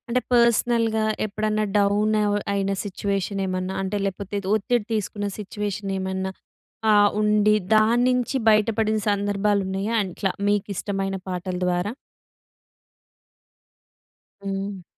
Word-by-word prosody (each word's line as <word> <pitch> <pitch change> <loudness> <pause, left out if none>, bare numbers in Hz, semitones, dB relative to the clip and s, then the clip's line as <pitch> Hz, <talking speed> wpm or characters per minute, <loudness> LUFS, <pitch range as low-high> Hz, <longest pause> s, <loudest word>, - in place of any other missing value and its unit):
అంటే 250 +2 +1
పర్స్‌నల్‌గా 235 -1 +3 0.2
ఎప్పుడన్నా 215 +1 -1
డౌన్ 205 +2 +2
అవ్ 205 0 +1 0.2
అయిన 195 0 0
సిట్యుయేషన్ 200 0 -2
ఏమన్నా, 185 0 -3
అంటే 195 +2 -2
లేకపోతే 200 +1 -4 0.2
ఒత్తిడి 220 +1 +1
తీసుకున్న 205 -1 -2
సిట్యుయేషన్ 205 -1 -4
ఏమన్నా 190 0 -2 0.6
ఆహ్, 205 -1 +6
ఉండి 210 0 +4 0.2
దాన్నించి 245 +4 +3
బయటపడిన 215 0 +2
సందర్భాలు 205 0 +1
ఉన్నాయా? 195 +4 -2
అట్లా 190 +1 -2 0.2
మీకు 205 -1 +1
ఇష్టమైన 195 0 -2
పాటల 180 0 -3
ద్వారా. 180 +5 0 2.5
హ్మ్. 195 -1 -4
205 Hz, 105 wpm, -24 LUFS, 195-215 Hz, 2.5 s, ఆహ్